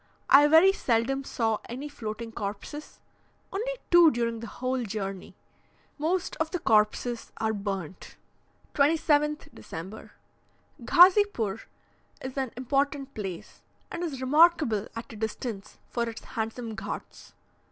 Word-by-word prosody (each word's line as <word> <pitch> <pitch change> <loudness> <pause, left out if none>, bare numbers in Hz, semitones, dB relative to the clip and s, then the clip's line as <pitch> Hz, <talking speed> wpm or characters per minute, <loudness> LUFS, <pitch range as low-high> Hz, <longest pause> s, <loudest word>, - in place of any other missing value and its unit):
I 290 +2 +8
very 325 +5 +7
seldom 265 -1 0
saw 225 -5 -1
any 260 +5 -5
floating 225 -4 -6
corpses; 210 +9 -6 0.5
only 460 +6 -2 0.2
two 345 -2 +8
during 235 -3 -1
the 230 - -7
whole 255 +3 -2
journey. 195 -3 -5 0.6
Most 350 +4 -1
of 315 0 -1
the 360 - -2
corpses 225 -2 +1
are 220 0 0
burnt. 195 -4 -5 0.6
27th 300 0 +2
December. 165 - -9 0.7
Ghazipoor 355 - +4 0.5
is 260 0 -7
an 265 -4 -2
important 275 +2 -1
place, 190 -5 -7 0.3
and 345 - -4
is 280 -7 -4
remarkable 290 - +4
at 230 0 -7
a - - -9
distance 220 -1 -5
for 235 -1 -1
its 225 - -9
handsome 225 +1 -4
ghauts. - - -8
245 Hz, 120 wpm, -27 LUFS, 220-300 Hz, 0.7 s, I